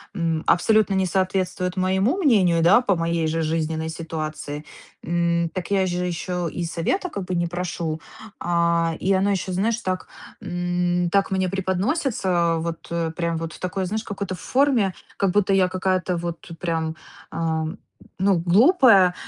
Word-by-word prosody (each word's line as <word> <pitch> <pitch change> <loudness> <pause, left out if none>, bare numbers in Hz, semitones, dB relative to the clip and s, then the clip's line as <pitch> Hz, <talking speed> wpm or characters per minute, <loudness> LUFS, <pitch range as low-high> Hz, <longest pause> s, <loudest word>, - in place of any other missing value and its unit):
м, 165 -3 -1
абсолютно 215 +2 +3
не 190 0 +2
соответствует 185 0 -1
моему 190 - +1
мнению, 200 - +3
да, 175 +8 +6
по 200 -6 +1
моей 165 -1 0
же 165 +1 -1
жизненной 160 0 -1
ситуации,- 155 -2 -5 0.4
м, 170 0 +1
так 185 0 -5
я 195 -1 +3
же 180 0 -1
ещё 180 0 -2
и 175 +2 -4
совета 175 - -1
как 200 - -5
бы 180 0 -3
не 175 0 0
прошу. 170 -2 -3 0.4
А, 170 -1 +1
и 195 - +1
оно 190 +1 +2
ещё, 190 -1 -2
знаешь, 215 +5 +1
так, 185 -5 -3 0.4
м, 175 -1 0
так 195 +2 +2
мне 190 -1 +1
преподносится, 190 - 0
вот 165 +1 -5 0.2
прям 170 -1 -1
вот 165 -1 -5
в - - -12
такой, 185 +1 -2
знаешь, 215 +4 -3
какой-то 200 -3 -4
форме, 250 - +2 0.2
как 195 -2 +1
будто 200 0 +2
я 185 -1 +3
какая-то 185 -1 0
вот 170 0 -6
прям, 160 -2 -2 0.4
а, 160 -1 -1 0.5
ну, 195 0 +3
глупая, 205 - +6
180 Hz, 155 wpm, -23 LUFS, 170-195 Hz, 0.5 s, да